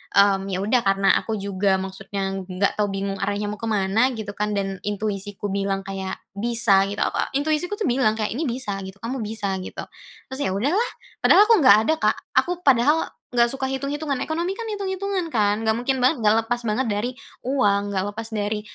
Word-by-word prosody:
mmm, 195 -1 +4
ya 190 0 -2
udah 235 +4 +3
karena 195 0 +4
aku 220 - -3
juga 195 -1 0
maksudnya 195 +1 -4 0.2
nggak 195 +3 -1
tahu, 210 - +3
bingung 195 0 -3
arahnya 205 +1 -1
mau 210 - -7
ke 225 - -4
mana 210 +3 +2
gitu 215 -2 -5
kan, 210 0 -2
dan 195 -1 -2
intuisiku 205 -1 -3
bilang, 195 0 -1
kayak 190 -1 -4 0.2
bisa 200 -2 +2
gitu, 205 +1 -1
a - - 0
a - - 0
intuisiku 310 +7 0
bilang 245 - +2
kayak 215 -1 -2
ini 290 +7 -2
bisa 235 -5 -3
gitu, 190 +1 -11
"kamu 255 +3 -3
bisa" 210 -2 -3
gitu, 185 - -7 0.5
terus 265 - -5
ya 190 - +1
udahlah. 320 - +1 0.3
Padahal 410 - +7
aku 460 - +6
nggak 255 -8 +8
ada, 315 - +3
Kak, - - +2 0.2
aku 355 0 -2
padahal 275 +4 +4 0.3
nggak 235 -1 +4
suka 270 0 -3
hitung-hitungan. 275 +1 -2
Ekonomi 340 +4 -2
kan 460 - -5
itung-itungan 390 -2 -2
kan, 210 -1 +2
nggak 220 0 +3
mungkin 260 +3 0
banget 255 +1 +2
nggak 210 0 +5
lepas 240 +1 -1
banget 220 +4 0
dari 215 +4 -1 0.3
uang, 205 -6 +1
nggak 190 -1 0
lepas 225 0 -5
dari 210 0 -2
215 Hz, 195 wpm, -23 LUFS, 200-265 Hz, 0.5 s, nggak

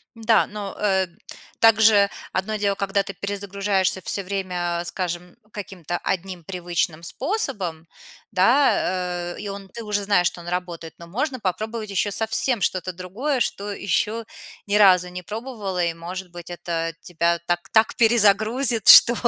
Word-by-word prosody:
Да, 225 0 +3
но, 205 -2 -6
э, 190 -2 +2 0.5
также 220 -2 +6 0.2
одно 205 +3 -1
дело- 200 -1 +1
когда 200 0 0
ты 195 - -7
перезагружаешься 200 -1 -1
всё 200 - -1
время, 180 -3 -2
скажем, 175 0 -4 0.2
каким-то 180 -4 -5
одним 185 -2 -3
привычным 175 -2 -2
способом, 190 - -3 0.4
да, 185 -5 +2
э, - - -11
и 205 - -5
он 195 0 -7
ты 230 +5 -8
уже 210 -1 -1
знаешь, 195 -3 +3
что - - -10
он 170 - -10
работает, 175 -2 -4
но 170 - -11
можно 255 - -3
попробовать 215 +3 -3
еще 200 +1 0
совсем 225 +3 0
что-то 185 0 -1
другое, 215 - -3
что 205 -2 -2
еще 210 +4 -1 0.4
ни 205 0 +1
разу 185 -3 +6
не 180 0 -7
пробовала, 210 -3 -4
и, 170 -1 -1
может 180 +2 -7
быть, 175 -1 -10
это 170 -1 -3
тебя 170 -1 0
так 175 +2 -1
так 220 0 +4
перезагрузит, 225 +1 +3
что 240 - +10
195 Hz, 150 wpm, -23 LUFS, 175-215 Hz, 0.5 s, что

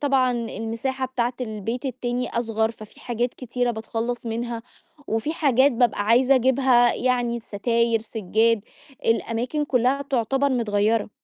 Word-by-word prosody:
طبعًا 270 -3 +2
المساحة 235 +3 -3
بتاعة 245 -1 -1
البيت 225 +1 -4
التاني 250 -1 -2
أصغر 225 -1 0
ففي 215 -2 -13
حاجات 240 0 -2
كتيرة 245 0 -2
باتخلص 230 +2 -4
منها 230 0 -3 0.5
وفي 225 +8 -1
حاجات 275 -3 +3
بابقى 235 -3 +2
عايزة 250 +4 +5
أجيبها، 255 -1 +4
يعني 245 -2 0
الستاير، 230 +1 0
سجّاد، 220 0 +1 0.4
الأماكن 230 +6 0
كلّها 260 0 +1
تعتبر 270 +1 0
متغيرة. 220 -3 +1
240 Hz, 125 wpm, -24 LUFS, 225-255 Hz, 0.5 s, عايزة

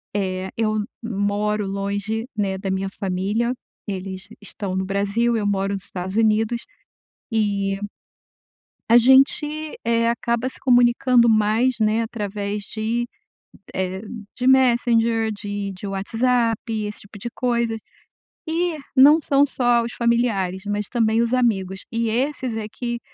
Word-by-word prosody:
eh, 190 -1 -2
eu 215 -1 0 0.3
moro 210 -1 -1
longe, 200 +3 -2
né, 195 -2 0
da 195 - -3
minha 190 0 -1
família, 200 +6 0 0.3
eles 190 -1 -5
estão 200 -2 -5
no 190 0 -1
Brasil, 200 +5 0
eu 215 -2 -1
moro 195 0 0
no - - -1
Estados 185 0 -6
Unidos, 225 +1 +2 0.7
e 200 -3 0 1.1
a 230 - +7
gente, 295 +5 +3
eh, 230 0 +2
acaba 235 +1 0
se - - -12
comunicando 245 -1 +4
mais, 220 +4 +3
né, 220 +1 +2
através 205 -2 -4
de, 225 +3 -2 0.7
eh, 190 0 -2 0.4
de 250 - -2
Messenger 235 -3 +3
de 205 -1 -4
de 190 +2 -8
WhatsApp, 225 +4 +1 0.3
esse 210 - -7
tipo 205 +1 -13
de 220 - -5
coisa, 235 -2 0 0.7
e 335 0 0 0.2
não 290 +4 +8
são 285 -1 +3
só 240 -3 +2
os 235 - -5
familiares, 225 -6 0
mas 205 0 -1
também 225 -2 +2
os 235 +1 0
amigos 195 -6 0
e 230 0 0
esses 255 -1 -1
é 215 -1 -4
que 240 0 -4
220 Hz, 135 wpm, -22 LUFS, 200-240 Hz, 1.1 s, não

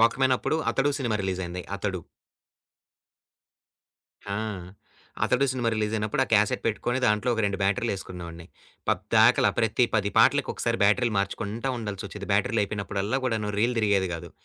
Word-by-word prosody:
వాక్‌మ్యానప్పుడు. 130 +5 +2
'అతడు' 145 +2 +1
సినిమా 120 -6 0
రిలీజయింది 90 -1 -3
'అతడు.' 95 -4 -3 2.3
ఆ! - - -2 0.9
'అతడు' 130 +2 +2
సినిమా 120 -3 -1
రిలీజయినప్పుడు, 110 +2 0
ఆ - - -14
క్యాసెట్ 105 -1 +3
పెట్టుకొని 120 +3 -1
దాంట్లో 105 +3 +1
ఒక 110 - -1
2 100 -1 -1
బ్యాటరీలు 100 +4 +1
ఏసుకునే 90 -2 -8
వాడిని. 85 0 -10 0.4
పద్దాకాల - - +4
ప్రతి 115 +1 +3
పది 105 -2 +1
పాటలలకొకసారి - - +2
బ్యాటరీలు 115 +2 +2
మార్చుకుంటా 105 +5 -2
ఉండాల్సొచ్చేది. 105 -1 -6
బ్యాటరీలయిపోయినప్పుడల్లా 100 +2 0
కూడాను 110 -4 -1
రీల్ 120 +3 +1
తిరిగేది 100 -3 +2
కాదు. 85 - -8
105 Hz, 125 wpm, -26 LUFS, 100-115 Hz, 2.3 s, పద్దాకాల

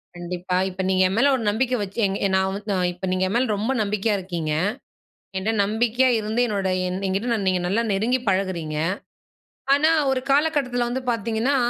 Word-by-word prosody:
கண்டிப்பா. 180 +1 -3
இப்ப 190 0 -5
நீங்க 185 0 +3
என் 190 - -2
மேல 280 +4 +4
ஒரு 245 - -3
நம்பிக்கை 250 +4 0
வச்சு, 200 +3 -6
எங் 195 - -2 0.2
நான் 190 0 +2
வ - - -4 0.2
அ - - 0 0.2
இப்போ 180 +2 -6
நீங்க 185 0 0
என் 190 - -3
மேல 250 +2 +2
ரொம்ப 220 +6 -1
நம்பிக்கையா 210 +1 0
இருக்கீங்க. 175 -4 -4 0.9
என்ட 195 +4 0
நம்பிக்கையா 235 +5 +2
இருந்து, 220 +3 -1
என்னோட 200 -3 -1 0.2
என் 180 +1 -3
என்கிட்ட 220 +5 0
நீங்க 185 -1 +2
நல்லா 205 +6 +1
நெருங்கி 225 +6 +1
பழகுறீங்க. 185 -5 -1 1.0
ஆனா, 305 +3 +3 0.2
ஒரு 265 -1 +1
காலகட்டத்தில 275 -4 +2
வந்து 255 +2 -3
பார்த்தீங்கன்னா, 230 +4 0
210 Hz, 175 wpm, -23 LUFS, 190-245 Hz, 1.0 s, மேல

